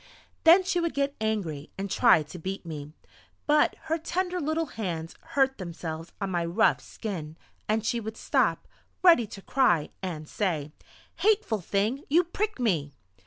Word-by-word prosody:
Then 345 +4 +8
she 360 -1 0
would 335 -4 -1
get 280 0 0
angry 180 -10 -2
and 195 +1 -3
try 160 -4 +5
to 155 +4 -10
beat 190 +2 -5
me. 150 -3 -7 0.5
But 300 0 +3
her 325 +1 -1
tender 360 +2 -2
little 315 +2 0
hands 175 - -4 0.2
hurt 270 -2 +3
themselves 165 -2 -6
on 195 -2 -2
my 175 -1 0
rough 180 +7 +2
skin, 165 -8 -6 0.3
and 220 0 +1
she 235 +1 +1
would 220 0 -6
stop, - - +1 0.4
ready 330 - +6
to 195 -1 -10
cry, 175 - +2
and 165 -5 -5
say: 155 -8 -2 0.5
"Hateful 410 - +2
thing! 210 - 0
You 335 +5 +5
prick 410 +2 -3
me!" 160 - 0
215 Hz, 160 wpm, -27 LUFS, -, 0.5 s, Then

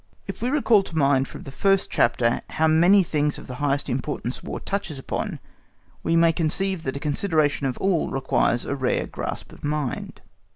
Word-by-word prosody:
If - - -7
we 245 - 0
recall 255 -7 +4
to 170 -4 -7
mind 135 -2 +3
from - - -10
the 135 - -9
first 195 +6 +1
chapter 115 0 +2
how 160 - +1
many 175 +5 +5
things 150 -3 0
of - - -10
the 130 - -7
highest 145 -1 +1
importance 130 -1 -3
War - - -5
touches 190 -7 -3
upon, 135 - -4 0.6
we 165 - +1
may 165 0 +5
conceive 185 +3 0
that 135 -2 -3
a - - -5
consideration 150 -2 +1
of 130 - -3
all 190 -4 +1
requires 130 -3 +1
a - - -2
rare 130 -2 0
grasp - - -6
of - - -15
mind. 150 -3 -3
150 Hz, 190 wpm, -24 LUFS, 135-180 Hz, 0.6 s, many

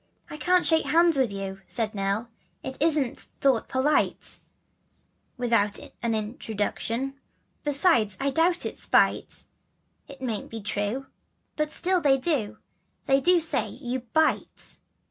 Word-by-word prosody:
" - - -32
I 300 - -6
can't 360 +3 +2
shake 320 -3 +3
hands 335 +3 +4
with 260 -5 +1
you," 195 -1 -5
said 225 -3 -2
Nell, 200 +3 -2 0.3
"It 265 - -5
isn't 300 -6 +1
thought 265 -5 +2
polite, 265 +4 0 1.0
Without 230 -4 +1 0.2
an 230 -2 0
introduction; 225 +4 -3 0.4
Besides, 275 - +2
no 275 0 0
doubt 340 +5 +2
it's - - -5
spite, - - +2 0.6
It 275 -1 -12
mayn't 235 -5 -4
be 225 - -6
true, 205 +5 -2 0.5
but 305 0 -1
still 360 +3 +1
they 275 -3 +4
do, 260 -7 -1 0.5
They 270 0 +3
do 355 +4 +5
say 325 0 +2
that - - -11
you 250 +2 -1
BITE." 255 +7 -1
265 Hz, 140 wpm, -26 LUFS, 220-305 Hz, 1.0 s, do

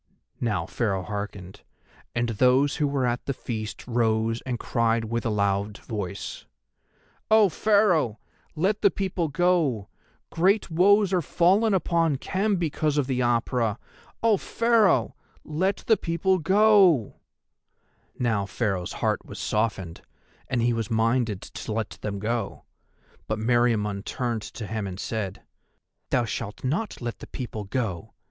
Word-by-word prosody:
Now 115 -3 -1
Pharaoh 100 -6 -1
hearkened, 100 -2 -6 0.5
and 120 0 0
those 130 +5 +3
who 150 -2 +1
were 140 -2 0
at 120 0 -2
the 140 - -1
feast 110 -4 -5
rose 115 -1 +1
and 125 -2 -1
cried 115 -1 0
with 115 +1 -2
a - - 0
loud 100 0 0
voice: 100 -3 -6 0.8
"O 215 -2 +6
Pharaoh, 180 - +2 0.4
let 195 +6 0
the 200 - +6
people 185 -4 -2
go! 150 - +1 0.4
Great 190 +3 +2
woes 195 +3 +4
are 180 - +3
fallen 195 +7 +3
upon 165 -4 +1
Khem 195 +9 0
because 155 -3 -1
of 145 - +2
the 130 -1 -1
Apura. 120 -2 +1 0.5
O 225 -3 +4
Pharaoh, 230 -2 +2 0.3
let 185 +6 -1
the 220 - +4
people 185 +3 +1
go!" 190 - +4 1.0
Now 110 -5 0
Pharaoh's 100 -4 -2
heart - - +1
was - - -10
softened 100 -6 -2 0.5
and 120 -2 0
he 120 0 +2
was 115 -2 -2
minded 115 -2 +1
to 110 - -6
let 110 -1 -2
them 100 -2 -3
go, 110 +1 -3 0.6
but 110 - -1
Meriamun 110 -3 +1
turned 120 -2 -2
to 110 +1 -7
him 110 -1 -3
and 95 0 -7
said: 105 -4 -4 0.7
"Thou 125 -2 +2
shalt 105 -1 -5
not 165 - -2
let 120 -1 -4
the - - -10
people 110 -5 -6
go. 95 -5 -3
120 Hz, 140 wpm, -26 LUFS, 110-170 Hz, 1.0 s, O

